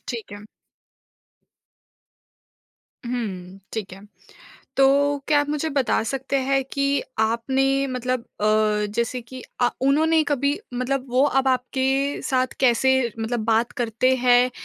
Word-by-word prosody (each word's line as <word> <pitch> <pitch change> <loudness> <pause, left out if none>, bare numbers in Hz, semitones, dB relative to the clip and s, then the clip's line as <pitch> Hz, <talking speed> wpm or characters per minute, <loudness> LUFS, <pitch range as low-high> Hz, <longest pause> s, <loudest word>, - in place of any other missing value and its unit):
ठीक 230 -4 -6
है। 205 - -7 2.7
हुँ, 195 -7 -5
ठीक 210 -4 -5
है। 190 - -10 0.8
तो 280 +1 +3
क्या 295 -1 +4
आप 290 - -3
मुझे 300 +1 -1
बता 275 -6 +1
सकते 270 +3 -2
हैं 270 0 +2
कि 275 0 +1 0.2
आपने 235 +5 +1 0.2
मतलब 255 -1 -2 0.2
अ, 215 0 +2
जैसे 235 +2 -1
कि 255 +2 -10 0.2
अ, 245 - +4
उन्होंने 315 +4 +3
कभी 285 +1 0 0.2
मतलब 255 +2 -1
वो 255 +2 +3 0.2
अब 265 - 0
आपके 265 +2 0
साथ 255 -1 0
कैसे 260 0 +4 0.3
मतलब 225 +1 -2
बात 225 +1 +1
करते 240 +2 +1
हैं? 250 0 +4
255 Hz, 125 wpm, -23 LUFS, 230-275 Hz, 2.7 s, क्या